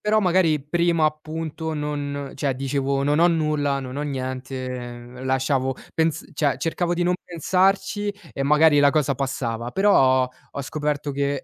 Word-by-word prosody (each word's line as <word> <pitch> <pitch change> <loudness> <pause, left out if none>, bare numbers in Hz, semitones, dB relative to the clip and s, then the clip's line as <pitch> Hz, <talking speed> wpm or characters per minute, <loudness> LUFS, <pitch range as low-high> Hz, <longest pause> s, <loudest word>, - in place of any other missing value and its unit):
però 215 +1 +2
magari 175 -5 +3
prima 170 +1 +1
appunto 155 +1 -3
non 145 -2 -3
cioè 140 -1 -1
dicevo: 135 +1 -1
"Non 145 +2 +2
ho 175 +1 +6
nulla, 150 -4 +1
non 130 0 -6
ho 145 - -2
niente", 130 -2 -5
lasciavo 130 0 0 0.2
pens 160 -1 0
cioè 145 -3 +1
cercavo 170 +5 -1
di 175 - 0
non 180 +1 +2
pensarci 190 +4 +1 0.2
e 135 - -3
magari 150 +1 +5
la 140 0 +6
cosa 145 -2 +1
passava. 120 -3 -3
Però 130 -9 +4 0.2
ho 140 - -5
scoperto 150 0 -2
che 140 0 -1
145 Hz, 150 wpm, -23 LUFS, 135-160 Hz, 0.2 s, ho